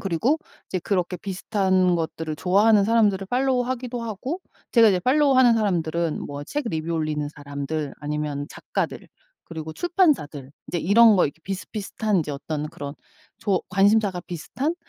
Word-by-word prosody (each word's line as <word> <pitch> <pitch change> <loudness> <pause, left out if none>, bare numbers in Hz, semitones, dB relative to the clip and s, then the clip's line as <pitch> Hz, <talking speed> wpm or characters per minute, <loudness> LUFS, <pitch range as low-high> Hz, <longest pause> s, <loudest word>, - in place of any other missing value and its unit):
그리고 200 - +1 0.3
이제 185 - -2
그렇게 180 -1 -1
비슷한 190 -1 +1
것들을 160 -1 -3
좋아하는 200 +5 +4
사람들을 210 -4 +2
팔로우 255 0 +2
하기도 245 -1 -4
하고 240 - -4 0.3
제가 230 -2 +7
이제 190 -3 +3
팔로우 270 +6 +3
하는 250 -2 +6
사람들은 170 -6 0
뭐 145 0 -6
책 290 - -3
리뷰 160 -1 -3
올리는 155 -2 -1
사람들 145 0 -5
아니면 150 -1 -3
작가들 - - -4 0.4
그리고 160 -1 -7
출판사들 270 - +1 0.2
이제 175 - -1
이런 215 +5 +6
거 180 - +4
이렇게 150 +3 -9
비슷비슷한 195 +3 -3
인제 150 -4 -1
어떤 150 +2 -4
그런 145 -4 -7 0.4
좋 200 -4 +1
관심사가 195 0 +3
비슷한? 255 - -3
185 Hz, 375 characters per minute, -24 LUFS, 160-225 Hz, 0.4 s, 제가